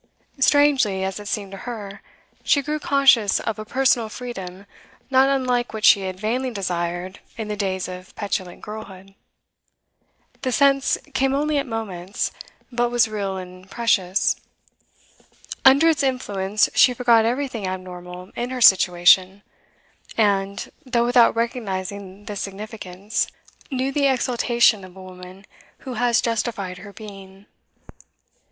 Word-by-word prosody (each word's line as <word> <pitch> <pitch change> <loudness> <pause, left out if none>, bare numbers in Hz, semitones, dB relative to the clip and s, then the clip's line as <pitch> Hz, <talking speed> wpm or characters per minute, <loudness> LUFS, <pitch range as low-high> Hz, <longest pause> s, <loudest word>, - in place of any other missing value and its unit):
Strangely, 270 -9 +3
as 190 +1 -3
it 205 - -9
seemed 200 -2 -3
to 195 - -8
her, 205 -4 -7 0.4
she 280 - +2
grew 300 +2 -2
conscious 270 -8 +4
of 220 -2 -4
a 215 - -6
personal 245 -2 +1
freedom 200 -6 -8 0.5
not 265 +1 +5
unlike 250 -4 0
what 220 - -1
she 200 - +7
had 185 -1 -5
vainly 245 +5 -1
desired 180 -3 -3 0.2
in 220 -2 -5
the 210 - -2
days 190 -2 -2
of 185 0 -10
petulant 190 -3 -4
girlhood; 195 -3 -9 1.3
the 260 - -1
sense 275 +1 +3 0.2
came 270 0 +1
only 295 +1 +1
at 275 - -4
moments, 200 -5 -4 0.4
but 240 0 0
was 240 -1 +3
real 200 -3 -3
and 185 0 -10
precious; 195 -5 +1 1.3
under 275 +4 +7
its 320 -3 +3
influence 210 -7 0
she 250 - +5
forgot 235 -2 +4
everything 240 -3 -2
abnormal 180 0 -7
in 240 +1 -3
her 255 0 -4
situation, 185 -1 +5 0.7
and 200 -2 0
though 240 -3 +1
without 240 -1 +4
recognising 200 -4 -4
this 205 -3 -5
significance 200 0 -4 0.4
knew 265 -1 -1
the 280 0 +2
exultation 240 -4 +2
of 185 0 -13
a 190 - -10
woman 185 +1 -12 0.4
who 260 - -5
has 240 0 +2
justified 210 -5 -2
her 200 +2 -11
being. 195 -2 -12
215 Hz, 135 wpm, -22 LUFS, 190-250 Hz, 1.3 s, she